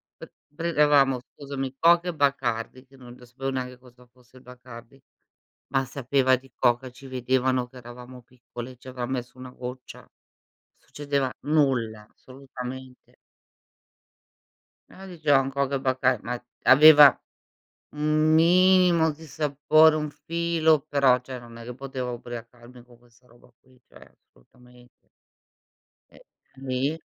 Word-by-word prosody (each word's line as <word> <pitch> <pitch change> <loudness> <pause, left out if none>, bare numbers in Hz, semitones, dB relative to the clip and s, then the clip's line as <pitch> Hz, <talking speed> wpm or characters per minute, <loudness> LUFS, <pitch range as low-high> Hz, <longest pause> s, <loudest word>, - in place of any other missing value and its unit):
pr - - -13 0.2
prendevamo, 150 -5 +2
scusami, 135 0 -7
Coca 170 +3 +4
e 175 - -2
Bacardi, 130 -3 -2
che 135 - -22
non 125 -2 -14
l 125 - -15
sapevo 135 +2 -5
neanche 125 -1 -5
cosa 125 -1 -20
fosse 125 +1 -23
il 125 - -18
Bacardi, 125 0 -14 0.8
ma 135 0 +2
sapeva 130 0 0
di 135 +1 -19
Coca, 120 +2 0
ci 135 +2 -14
vedevano 130 0 -1
che 130 - -23
eravamo 125 +1 -12
piccoli, 120 0 -11
ci 130 - -16
avran 125 -1 -6
messo 125 -1 -5
una 130 0 -10
goccia. 125 0 -10 0.6
Succedeva 140 -3 -4
nulla, 125 -8 0
assolutamente. 130 -1 -11 1.8
Eh, 195 0 -12
dicevan: 145 -5 +1
"Coca 140 0 -1
e 135 - -5
Bacar" 130 0 +1
ma 125 - -2 0.4
aveva 150 +1 +9 0.9
un 155 +1 +1
minimo 175 -1 +4
di 160 +2 -13
sapore, 155 +1 +3
un 150 -1 -3
filo, 165 -2 0
però, 135 -3 +3
cioè 125 0 -8
non 115 -1 -14
è 115 - -10
che 125 - -8
potevo 130 -1 -6
ubriacarmi 120 +1 -11
con 120 -1 -21
questa 120 +1 -27
roba 120 +1 -23
qui, 130 -1 -26
cioè, - - -18
assolutament 125 - -23 1.2
Eh, - - -19 0.4
nì. 135 +3 -3
130 Hz, 135 wpm, -25 LUFS, 125-145 Hz, 1.8 s, aveva